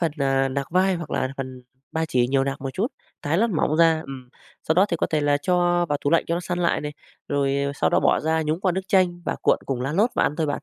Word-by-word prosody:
phần, 165 Hz, -3 st, 0 dB
à, 135 Hz, -1 st, +2 dB
nạc 140 Hz, +1 st, -4 dB
vai 185 Hz, +2 st, +3 dB
hoặc 170 Hz, -3 st, -6 dB
là 130 Hz, -, -1 dB
phần 130 Hz, -1 st, -6 dB, 0.3 s
ba 160 Hz, 0 st, 0 dB
chỉ 125 Hz, -6 st, +1 dB
nhiều 135 Hz, 0 st, +2 dB
nạc 140 Hz, +1 st, -3 dB
một 135 Hz, -1 st, -4 dB
chút, 205 Hz, -, 0 dB, 0.4 s
thái 155 Hz, +4 st, 0 dB
lát 230 Hz, +2 st, +2 dB
mỏng 155 Hz, -3 st, 0 dB
ra. 165 Hz, -1 st, +4 dB
Ừm, 130 Hz, -4 st, -9 dB, 0.3 s
sau 160 Hz, -, 0 dB
đó 185 Hz, +4 st, +4 dB
thì 170 Hz, -, -1 dB
có -, -, 0 dB
thể 155 Hz, -1 st, +1 dB
là 145 Hz, 0 st, +2 dB
cho 175 Hz, +2 st, +1 dB
vào 145 Hz, -1 st, 0 dB
tủ 145 Hz, -, 0 dB
lạnh 165 Hz, -, +3 dB
cho 170 Hz, -, 0 dB
nó 175 Hz, -, -2 dB
săn 175 Hz, 0 st, -3 dB
lại 175 Hz, -1 st, +1 dB
này, 150 Hz, 0 st, -5 dB, 0.4 s
rồi 140 Hz, -1 st, 0 dB, 0.2 s
sau -, -, +1 dB
đó -, -, +3 dB
bỏ -, -, +3 dB
ra 160 Hz, +1 st, 0 dB
nhúng 155 Hz, +3 st, -2 dB
qua 190 Hz, -2 st, +1 dB
nước 190 Hz, +1 st, -4 dB
chanh 180 Hz, -2 st, +2 dB
và -, -, -2 dB
cuộn -, -, +3 dB
cùng 130 Hz, -3 st, -2 dB
lá 135 Hz, +4 st, -2 dB
lốt 210 Hz, +8 st, +2 dB
và -, -, +2 dB
ăn 150 Hz, -, 0 dB
thôi 160 Hz, -2 st, 0 dB
bạn. 145 Hz, -, -3 dB
160 Hz, 290 wpm, -23 LUFS, 140-175 Hz, 0.4 s, ra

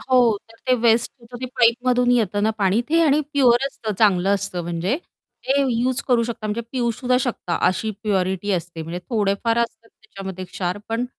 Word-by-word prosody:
हो. 245 Hz, -5 st, +3 dB
तर 225 Hz, -, -17 dB
ते 255 Hz, -, +4 dB
वेस्ट 230 Hz, 0 st, +3 dB
होतं 240 Hz, +1 st, -11 dB
ते 255 Hz, -, -3 dB
पाईपमधून 245 Hz, +1 st, +3 dB
येतं 205 Hz, -4 st, +1 dB
ना, 220 Hz, -, +3 dB
पाणी 200 Hz, +3 st, +2 dB
ते 330 Hz, +2 st, +3 dB
आणि 300 Hz, -1 st, +4 dB
प्युअर 260 Hz, -2 st, +4 dB
असतं 225 Hz, -5 st, -5 dB
चांगलं 195 Hz, -2 st, +4 dB
असतं 195 Hz, -3 st, -3 dB
म्हणजे 175 Hz, -, -1 dB, 0.5 s
ते 265 Hz, -, +3 dB, 0.2 s
यूज 250 Hz, +2 st, 0 dB
करू 240 Hz, -2 st, +4 dB
शकता 225 Hz, -2 st, -5 dB
म्हणजे 210 Hz, +3 st, -2 dB
पिऊसुद्धा 250 Hz, 0 st, 0 dB
शकता 245 Hz, -9 st, -2 dB
अशी 215 Hz, +4 st, 0 dB
प्युरिटी 190 Hz, -1 st, 0 dB
असते. 170 Hz, -2 st, -3 dB
म्हणजे 165 Hz, +2 st, -5 dB
थोडेफार 220 Hz, +1 st, +1 dB
असतात 230 Hz, -1 st, -3 dB
त्याच्यामध्ये 190 Hz, -4 st, -9 dB
क्षार, 180 Hz, +1 st, -3 dB
पण 230 Hz, +2 st, -1 dB
225 Hz, 175 wpm, -22 LUFS, 195-245 Hz, 0.5 s, ते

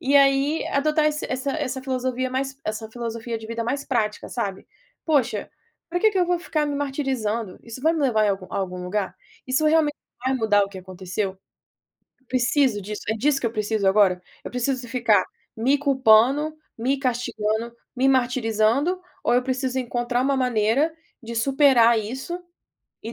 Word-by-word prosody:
E 275 Hz, +2 st, +3 dB
aí, 275 Hz, +2 st, +3 dB
adotar 305 Hz, +2 st, +2 dB
esse 300 Hz, 0 st, -1 dB
essa 260 Hz, +2 st, -2 dB
essa 265 Hz, -4 st, -3 dB
filosofia 255 Hz, -1 st, -2 dB
mais 265 Hz, +1 st, -2 dB
essa 220 Hz, +1 st, -4 dB
filosofia 230 Hz, 0 st, -4 dB
de 220 Hz, 0 st, -8 dB
vida 230 Hz, 0 st, -3 dB
mais 275 Hz, +4 st, -2 dB
prática, 215 Hz, -5 st, -1 dB
sabe. 200 Hz, -5 st, -4 dB, 0.4 s
"Poxa, 250 Hz, -9 st, +1 dB, 0.4 s
pra 355 Hz, -, 0 dB
que 435 Hz, -, +5 dB
que 395 Hz, -, -1 dB
eu 360 Hz, -, +4 dB
vou 355 Hz, 0 st, +1 dB
ficar 310 Hz, -3 st, -1 dB
me 290 Hz, -, -2 dB
martirizando? 260 Hz, -8 st, -2 dB
Isso 235 Hz, +2 st, -9 dB
vai 320 Hz, +2 st, +4 dB
me 325 Hz, -, -2 dB
levar 235 Hz, -6 st, +3 dB
em -, -, +3 dB
algum 195 Hz, -1 st, -3 dB
a -, -, -4 dB
algum 180 Hz, -2 st, -3 dB
lugar? 190 Hz, +2 st, -2 dB, 0.3 s
Isso 260 Hz, +4 st, +1 dB
realmente 305 Hz, -1 st, +3 dB, 0.3 s
vai 260 Hz, +1 st, +2 dB
mudar 220 Hz, -5 st, +3 dB
o -, -, -9 dB
que 195 Hz, -1 st, -9 dB
aconteceu? 185 Hz, +1 st, -4 dB, 0.9 s
Preciso 255 Hz, -3 st, +2 dB
disso, 210 Hz, +2 st, -6 dB
é -, -, +2 dB
disso 275 Hz, +5 st, +2 dB
que 250 Hz, -, -3 dB
eu 225 Hz, -, -5 dB
preciso 215 Hz, -2 st, 0 dB
agora? 190 Hz, -2 st, +4 dB, 0.2 s
Eu -, -, -6 dB
preciso 250 Hz, +1 st, -1 dB
ficar 230 Hz, -3 st, +3 dB, 0.3 s
me 255 Hz, +6 st, +2 dB
culpando, 270 Hz, +1 st, +4 dB, 0.2 s
me 260 Hz, +5 st, 0 dB
castigando, 235 Hz, -3 st, -1 dB, 0.2 s
me 260 Hz, +2 st, +2 dB
martirizando, 250 Hz, -, +2 dB, 0.2 s
ou -, -, +2 dB
eu 250 Hz, -, +3 dB
preciso 260 Hz, 0 st, -1 dB
encontrar 240 Hz, 0 st, -1 dB
uma 275 Hz, +1 st, +2 dB
maneira 250 Hz, +5 st, +2 dB, 0.3 s
de 235 Hz, +1 st, -6 dB
superar 245 Hz, -2 st, +5 dB
isso, 260 Hz, +11 st, -5 dB, 0.7 s
e 225 Hz, -, -6 dB
250 Hz, 175 wpm, -24 LUFS, 220-275 Hz, 0.9 s, que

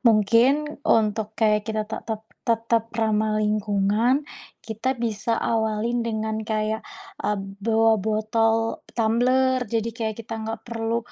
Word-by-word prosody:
Mungkin, 240 Hz, +7 st, +3 dB
untuk 215 Hz, -3 st, +1 dB
kayak 210 Hz, -2 st, +3 dB
kita 215 Hz, -1 st, 0 dB
te 220 Hz, -, -3 dB
tet 220 Hz, -1 st, -3 dB, 0.3 s
tetap 230 Hz, 0 st, +1 dB
ramah 215 Hz, -1 st, +1 dB
lingkungan 210 Hz, +5 st, +1 dB, 0.4 s
kita 230 Hz, +4 st, -2 dB
bisa 230 Hz, -1 st, -1 dB
awalin 225 Hz, +1 st, 0 dB
dengan 220 Hz, -1 st, -2 dB
kayak, 220 Hz, 0 st, -1 dB, 0.4 s
eee, 210 Hz, -, 0 dB, 0.3 s
bawa 225 Hz, 0 st, +4 dB
botol 225 Hz, +2 st, +1 dB, 0.2 s
tumbler, 255 Hz, +3 st, +3 dB
jadi 230 Hz, 0 st, 0 dB
kayak 220 Hz, -2 st, -2 dB
kita 225 Hz, -, -5 dB
nggak 225 Hz, +1 st, -4 dB
perlu 230 Hz, 0 st, -1 dB
225 Hz, 125 wpm, -24 LUFS, 215-230 Hz, 0.4 s, bawa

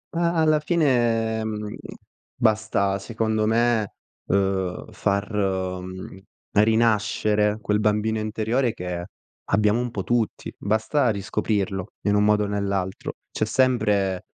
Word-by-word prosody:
A 170 Hz, 0 st, +2 dB
alla 155 Hz, -1 st, +3 dB
fine, 120 Hz, -9 st, +1 dB
mhmm, 105 Hz, -1 st, -4 dB, 0.6 s
basta, 110 Hz, -4 st, +1 dB
secondo 110 Hz, 0 st, -1 dB
me, 115 Hz, -2 st, +2 dB, 0.3 s
uhm, 95 Hz, -2 st, -1 dB
far, 100 Hz, +1 st, -1 dB
mhmm, 95 Hz, -1 st, -3 dB, 0.3 s
rinascere 105 Hz, -1 st, +2 dB
quel 105 Hz, +1 st, +1 dB
bambino 105 Hz, +1 st, +1 dB
interiore 110 Hz, +3 st, 0 dB
che 90 Hz, -3 st, -5 dB, 0.4 s
abbiamo 105 Hz, +3 st, +2 dB
un 125 Hz, -1 st, -2 dB
po' 100 Hz, -4 st, -3 dB
tutti. 120 Hz, 0 st, -1 dB
Basta 110 Hz, +6 st, +1 dB
riscoprirlo 100 Hz, -2 st, -2 dB
in 105 Hz, 0 st, +1 dB
un 105 Hz, -, +3 dB
modo 105 Hz, 0 st, +3 dB
o 105 Hz, -, -1 dB
nell'altro. 100 Hz, -2 st, -2 dB, 0.2 s
C'è 110 Hz, -, -1 dB
sempre, 105 Hz, -7 st, +1 dB
105 Hz, 115 wpm, -24 LUFS, 100-115 Hz, 0.6 s, alla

